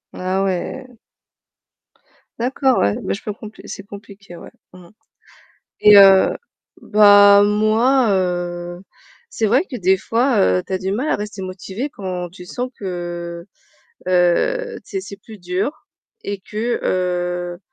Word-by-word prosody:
Ah 185 +1 -1
ouais. 195 +7 -3 1.5
D'accord 260 +2 +1
ouais. 100 0 +1
Bah - - -2
je 200 - -6
peux 210 - -5
compr 215 +1 -12
que - - -14
c'est 200 - -8
compliqué, 200 -2 -13
ouais, - - -11 0.2
mmh 180 -1 -14
mh. - - -21 0.9
Et 210 -1 +9
heu, 195 -1 +7 0.5
bah 205 -1 +6
moi, 220 +5 +2
heu, 175 -2 -2 0.5
c'est 225 - -2
vrai 250 - +3
que 265 - -6
des 190 -2 +2
fois, 235 +5 0
heu, 90 0 +2
tu - - -12
as - - +1
du 190 +1 -4
mal 255 +8 -2
à - - +2
rester 210 -1 -6
motivé 190 +7 -6
quand 185 -6 -6
tu 180 +1 -13
sens 250 +7 -5
que, 175 -2 -6 0.6
heu, 185 - +1
tu - - -19
sais 390 - -3
c'est 205 - -10
plus 215 +1 -13
dur 180 +6 -2 0.5
et 200 -1 -4
que, 225 +5 -3
heu, 175 -1 -2
195 Hz, 150 wpm, -19 LUFS, 180-215 Hz, 1.5 s, Et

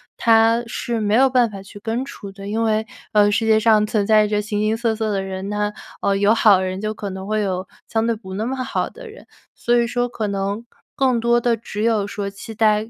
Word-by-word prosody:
它 225 +1 +4
是 235 -1 -3
没 210 0 +1
有 265 +2 +5
办 245 -3 +2
法 195 -1 -8
去 200 +1 -12
根 235 +4 -2
除 200 -7 -9
的。 195 0 -10
因 220 +2 -1
为， 220 0 +1 0.2
呃， 205 -1 +5
世 205 +2 +1
界 220 -1 +4
上 220 -1 +4
存 210 -2 0
在 215 -1 +5
着 210 0 0
形 210 0 -2
形 215 +1 +1
色 230 -1 0
色 220 -1 -2
的 195 - 0
人， 190 +1 -5
那， 210 0 -1 0.3
呃， 200 - +1
有 200 +2 +4
好 205 -4 +5
人 185 0 -3
就 215 +1 -2
可 205 -2 -6
能 190 0 -7
会 215 0 0
有 185 -2 -2 0.2
相 225 0 0
对 230 - +1
不 190 -3 -9
那 215 - -2
么 265 +3 -2
好 - - -2
的 - - -11
人， 440 - -14 0.3
所 240 - 0
以 235 -1 +3
说 245 +1 -1
可 220 -3 -4
能 200 +3 -3 0.3
更 260 -3 +2
多 235 +1 +2
的 235 -1 +1
只 215 -1 -5
有 220 -3 +1
说 200 -1 -4
期 200 +3 -9
待 215 0 +2
215 Hz, 260 characters per minute, -21 LUFS, 205-230 Hz, 0.3 s, 有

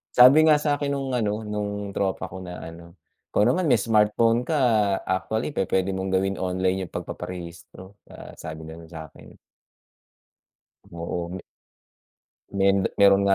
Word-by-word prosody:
Sabi 130 +5 +8
nga 155 -1 +5
sa'kin 145 -1 -1
nung 135 -2 -2
ano 110 -2 -1
nung 105 -1 -4
tropa 95 -1 -1
ko 95 +1 -9
na 90 -1 -8
ano, 85 +2 -11 0.3
"ikaw 105 - +3
naman 160 +4 +2
may 115 - +5
smartphone 115 +2 +2
ka 155 +4 -1 0.5
actually 110 +9 -2
pu - - +1
puwede 95 0 +1
mong 95 0 -3
gawin 95 +1 +1
online 95 +1 -1
yung 90 - -7
pagpaparehistro," 90 +2 -8 0.2
ah, - - -11
sabing 80 0 -8
gano'n 80 0 -13
sa'kin. 80 -3 -12 1.5
Oo, 85 0 -5
me 95 0 -6 1.2
Men 95 0 +4 0.2
mayro'n 100 0 +6
nga 100 0 +4
95 Hz, 145 wpm, -24 LUFS, 90-115 Hz, 1.5 s, Sabi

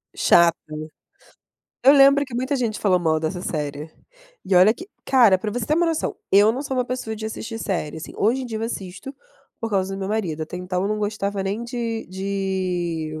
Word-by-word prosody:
Chato, 170 -1 +5 1.3
eu 275 - +8
lembro 280 0 +6
que 255 - -10
muita 260 +4 -1
gente 235 -5 -1
falou 185 -3 +2
mal 160 -2 +2
dessa 170 +3 -3
série, 150 -1 -4 0.5
e 190 - 0
olha 185 +4 +7
que 365 - -11 0.2
cara 240 -8 +5
para 210 +3 -4
você 225 0 -3
ter 305 - +2
uma 345 +1 +2
noção, 325 -1 -1
eu 205 +3 +6
não 260 +4 -4
sou 265 -2 -3
uma 250 - +1
pessoa 240 -3 -4
de 220 0 -5
assistir 225 +1 -6
série, 170 -8 -3
assim, 160 - -8
hoje 245 +6 +1
em - - -5
dia 225 -2 -4
eu - - -5
assisto, 200 +2 -6 0.5
por 225 - -2
causa 195 -1 0
do - - -6
meu 190 - -3
marido 180 -8 -2
até 180 - -8
então 180 0 -2
eu 200 - 0
não 215 0 -1
gostava 205 -2 -2
nem 205 +5 -3
de 235 -2 -4
de, 185 -5 -2
205 Hz, 210 wpm, -23 LUFS, 180-235 Hz, 1.3 s, eu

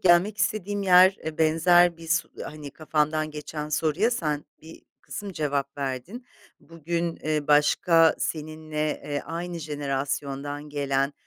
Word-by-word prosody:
gelmek 185 +4 +4
istediğim 205 +1 -1
yer, 185 0 +6
eee, 160 -1 -5
benzer 170 +2 +4
bir 165 0 -11
s 165 +1 +1 0.2
hani, 150 -2 -8
kafamdan 155 0 -1
geçen 150 0 -6
soruya 155 +8 +1
sen 150 -10 -2 0.2
bir 160 +1 -13 0.2
kısım 205 -2 -7
cevap 145 -3 -2
verdin. 140 - -5 0.3
Bugün, 165 +1 -3
eee, 155 -1 -1
başka 160 +2 +4
seninle, 155 -1 -3
eee, 145 -1 -2
aynı 170 +1 -5
jenerasyondan 145 -1 -3
gelen 140 -1 0
155 Hz, 130 wpm, -26 LUFS, 145-175 Hz, 0.3 s, yer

